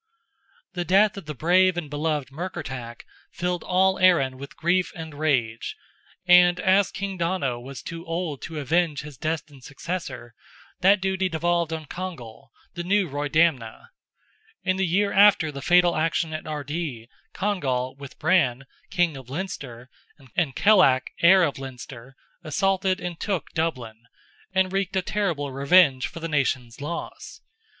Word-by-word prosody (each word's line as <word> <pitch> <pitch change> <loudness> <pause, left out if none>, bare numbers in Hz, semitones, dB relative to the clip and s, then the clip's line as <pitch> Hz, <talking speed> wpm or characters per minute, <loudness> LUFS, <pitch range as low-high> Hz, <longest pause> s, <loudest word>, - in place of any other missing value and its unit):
The 175 - -2
death 195 +3 +3
of 195 -6 -9
the 150 - -5
brave 180 +5 +3
and 170 -4 -3
beloved 150 -2 -2
Murkertach 130 -7 -6 0.3
filled 180 0 -3
all 190 +1 +2
Erin 170 -8 +4
with 140 0 -10
grief 180 +2 +1
and 160 -3 -8
rage, 130 -7 -1 0.5
and 180 0 +6
as 195 +1 +3
King 195 -2 -5
Donogh 165 -9 -1
was 135 +1 -9
too 165 0 -7
old 165 -4 -3
to 160 -1 -7
avenge 155 +1 0
his 150 -2 -10
destined 155 -4 -4
successor, 140 -5 -6 0.5
that 190 +2 +4
duty 190 0 0
devolved 170 0 0
on 160 -1 -4
Congal, 140 -8 -8 0.2
the 175 -1 -5
new 195 +1 +2
Roydamna. 145 -4 0 0.7
In 185 0 0
the 190 -1 +1
year 200 +4 +1
after 200 -6 +5
the 140 -1 -7
fatal 175 +3 +4
action 160 0 0
at 155 - -6
Ardee, 145 -5 -4 0.3
Congal, 135 -11 -1
with 140 -1 -11
Brann, 135 -7 +2 0.2
King 175 -5 +1
of 130 -2 -11
Leinster, 140 -7 -6 0.5
and 155 -7 0
Kellach, 185 -12 +4
heir 185 +2 +7
of 145 -4 -1
Leinster, 130 -1 -10 0.3
assaulted 190 +3 0
and 175 -2 -6
took 195 -4 -3
Dublin, 120 -9 -3 0.5
and 190 0 +1
wreaked 195 0 -1
a 190 - +1
terrible 170 -9 -2
revenge 140 0 +4
for 165 - -9
the 165 - -4
nation's 130 -5 -1
loss. 170 +4 -7
165 Hz, 145 wpm, -24 LUFS, 140-185 Hz, 0.7 s, heir